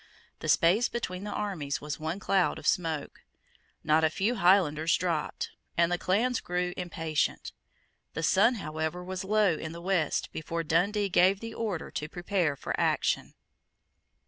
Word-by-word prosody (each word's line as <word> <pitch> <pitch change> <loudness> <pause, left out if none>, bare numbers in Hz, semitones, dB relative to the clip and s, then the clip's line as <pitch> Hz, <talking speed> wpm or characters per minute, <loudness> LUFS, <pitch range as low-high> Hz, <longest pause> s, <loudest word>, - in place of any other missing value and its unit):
The - - -4
space 195 +9 +4
between 190 -4 -4
the 210 - -4
armies 185 -10 -3
was 150 0 -5
one 160 +5 -3
cloud 195 -2 +1
of - - -10
smoke. 160 -5 -1 0.6
Not 155 +1 +3
a 160 - +4
few 200 +8 0
Highlanders 175 -6 +3
dropped; 170 -4 -2 0.3
and 170 0 +3
the 175 - 0
clans 230 +7 +1
grew 180 0 -2
impatient. 165 -4 -2 0.6
The 165 - -3
sun 215 +9 +4
however 160 -2 -3
was 185 +1 -5
low 205 -2 +3
in 160 +1 -5
the 170 - -8
west 175 -4 0
before 165 +1 -3
Dundee 200 +6 +1
gave 190 +1 +4
the 230 +1 -7
order 210 -9 -3
to 150 - -4
prepare 175 -4 0
for - - -4
action. - - 0
180 Hz, 155 wpm, -29 LUFS, 160-195 Hz, 0.6 s, space